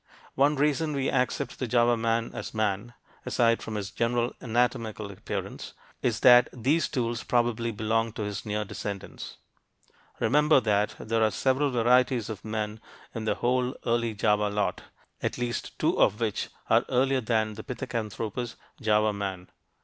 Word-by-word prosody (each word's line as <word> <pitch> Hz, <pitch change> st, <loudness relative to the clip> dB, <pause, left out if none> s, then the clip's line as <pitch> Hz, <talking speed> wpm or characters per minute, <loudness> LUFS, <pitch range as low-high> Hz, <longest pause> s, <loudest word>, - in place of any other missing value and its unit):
One 145 Hz, +3 st, +3 dB
reason 150 Hz, +2 st, +1 dB
we 135 Hz, -1 st, 0 dB
accept 135 Hz, +1 st, -1 dB
the 130 Hz, -, -2 dB
Java 120 Hz, 0 st, +3 dB
man 115 Hz, 0 st, 0 dB
as -, -, -6 dB
man 110 Hz, +2 st, -1 dB, 0.3 s
aside 115 Hz, -1 st, +2 dB
from 110 Hz, -, -5 dB
his 100 Hz, -1 st, -4 dB
general 120 Hz, +2 st, 0 dB
anatomical 115 Hz, -3 st, -1 dB
appearance 95 Hz, -, -6 dB, 0.3 s
is 120 Hz, -2 st, 0 dB
that 125 Hz, -1 st, +7 dB
these 135 Hz, +7 st, +1 dB
tools 120 Hz, -4 st, -2 dB
probably 120 Hz, -1 st, +1 dB
belonged 115 Hz, +1 st, -1 dB
to 110 Hz, -, -3 dB
his 105 Hz, -1 st, -4 dB
near 105 Hz, 0 st, -2 dB
descendants. 100 Hz, 0 st, -6 dB, 0.8 s
Remember 150 Hz, +5 st, +4 dB
that 105 Hz, -3 st, +1 dB
there 115 Hz, 0 st, 0 dB
are 110 Hz, -, +4 dB
several 135 Hz, +6 st, +1 dB
varieties 125 Hz, -1 st, +2 dB
of 105 Hz, -, -8 dB
men 110 Hz, 0 st, -3 dB, 0.3 s
in 110 Hz, -1 st, -4 dB
the -, -, +1 dB
whole 125 Hz, +1 st, 0 dB
early 115 Hz, -2 st, 0 dB
Java 105 Hz, 0 st, +2 dB
lot, 105 Hz, 0 st, -1 dB, 0.4 s
at -, -, -2 dB
least 120 Hz, -1 st, -3 dB
two -, -, +1 dB
of 105 Hz, -, +3 dB
which 110 Hz, -4 st, -1 dB, 0.2 s
are -, -, +4 dB
earlier 130 Hz, +1 st, +2 dB
than 110 Hz, -2 st, 0 dB
the 110 Hz, +1 st, -8 dB
Pithecanthropus, 115 Hz, -2 st, -4 dB, 0.3 s
"Java 105 Hz, 0 st, +3 dB
man." 95 Hz, -3 st, -5 dB
115 Hz, 155 wpm, -27 LUFS, 110-125 Hz, 0.8 s, that